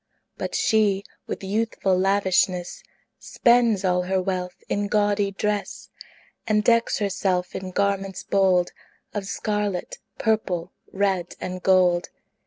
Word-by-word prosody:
But - - -4
she, 205 -3 +2 0.2
with - - -5
youthful 200 -1 0
lavishness, 185 -2 +1 0.4
Spends 235 -5 +3
all 180 -1 +2
her 190 +1 0
wealth 180 -1 -3
in 205 0 -1
gaudy 205 -1 +1
dress, 205 +1 -3 0.6
And 210 -1 +2
decks 230 +1 +3
herself 190 -3 -1
in 190 0 -4
garments 195 0 -1
bold 185 -2 +2 0.4
Of 200 -2 -4
scarlet, 210 - -2 0.2
purple, 185 -6 0 0.2
red, 190 -3 -1
and 185 0 -5
gold. 180 -2 +3
195 Hz, 115 wpm, -24 LUFS, 185-210 Hz, 0.6 s, Spends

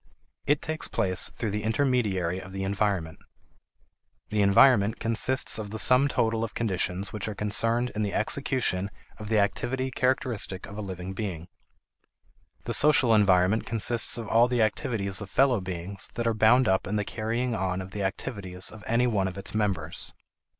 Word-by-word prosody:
It 145 0 +2
takes 155 0 -3
place 95 -5 -1
through 110 - -4
the 105 +1 -2
intermediary 110 -7 0
of 95 +1 -11
the 95 0 -4
environment. 95 -5 -1 1.1
The 105 0 0
environment 100 +2 +5
consists 115 +1 +1
of 105 -2 -5
the 110 - -5
sum 125 +5 +5
total 115 -4 0
of 115 - -5
conditions 95 -2 -2
which 105 -1 -4
are 105 - -4
concerned 115 +4 +1
in 110 - -3
the 100 -2 -1
execution 110 -5 0 0.3
of 105 -1 -7
the 110 - +2
activity 125 +6 -1
characteristic 125 -7 -1
of 100 - -10
a 105 - -5
living 95 -1 -6
being. 95 -5 -5 1.1
The - - -3
social 140 -6 +5
environment 100 0 +3
consists 115 +1 +1
of 115 -2 -6
all 115 +3 +4
the 125 -2 +1
activities 110 -4 0
of 100 - -7
fellow 130 -4 +2
beings 95 +1 -6
that 120 - -2
are 115 - +2
bound 110 +3 +4
up 95 0 +1
in 105 - -2
the 105 -1 -1
carrying 115 +4 -2
on 95 -3 -2
of 95 0 -8
the 100 - -5
activities 95 -1 -3
of 110 -1 -12
any 120 +2 +2
one 105 -6 +1
of 95 - -6
its 100 - -5
members. 95 -7 -2
105 Hz, 175 wpm, -27 LUFS, 95-120 Hz, 1.1 s, environment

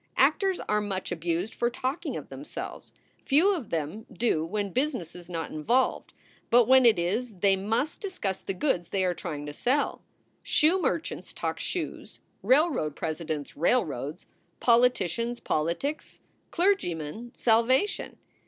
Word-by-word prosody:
Actors 385 -2 +3
are 210 0 0
much 190 -3 -3
abused 175 +4 -2
for 240 - 0
talking 260 +6 -3
of - - -8
themselves. - - -7 0.3
Few 330 +9 +4
of 310 - -5
them 165 +7 -3
do 220 -9 +1
when 200 +4 -2
business 255 - -1
is 175 0 -11
not 165 -3 -4
involved, 240 +13 +1 0.4
but 240 -1 +5
when 260 -1 +7
it 220 -4 +5
is 210 +7 -1
they 195 +1 +4
must 225 +9 -1
discuss 290 - -3
the 195 - -4
goods 180 - 0
they 190 -1 0
are 180 - +1
trying 155 -4 -5
to 145 - -6
sell. 265 - 0 0.4
Shoe 340 +5 +3
merchants 330 0 -2
talk - - -3
shoes: - - -4 0.2
railroad 265 - +2
presidents, 155 -2 -4
railroads; 155 - 0 0.3
poli 240 +1 +6
ticians, 235 +3 -3
politics; 170 - -2 0.3
clergymen, 235 - 0
salvation. 245 - +2
210 Hz, 140 wpm, -28 LUFS, 170-260 Hz, 0.4 s, when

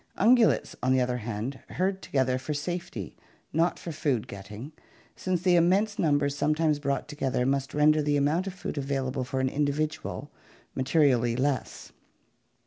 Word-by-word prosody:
Un 235 - +6
gulates, 235 -3 +2
on 130 - +1
the 130 - +3
other 125 0 0
hand, 115 +3 -4
herd 190 +1 -1
together 130 -2 0
for 145 +3 -4
safety, 170 - -4 0.4
not 165 +3 +2
for 170 - -6
food 145 -7 -1
getting, 105 +8 -8 0.4
since 180 -2 -2
the 180 -2 +4
immense 195 +5 +3
numbers 145 -3 +2
sometimes 150 +1 +1
brought 140 -1 -1
together 135 -4 -1
must 135 +1 -1
render 150 +1 +4
the 145 0 +1
amount 155 +7 +1
of 190 - -4
food 155 - -4
available 135 -1 -2
for 130 +1 -3
an 130 - +1
individual 150 +2 -2 0.4
ma - - -3
terially 130 -4 +3
less. 135 -2 -2
145 Hz, 160 wpm, -28 LUFS, 130-160 Hz, 0.4 s, Un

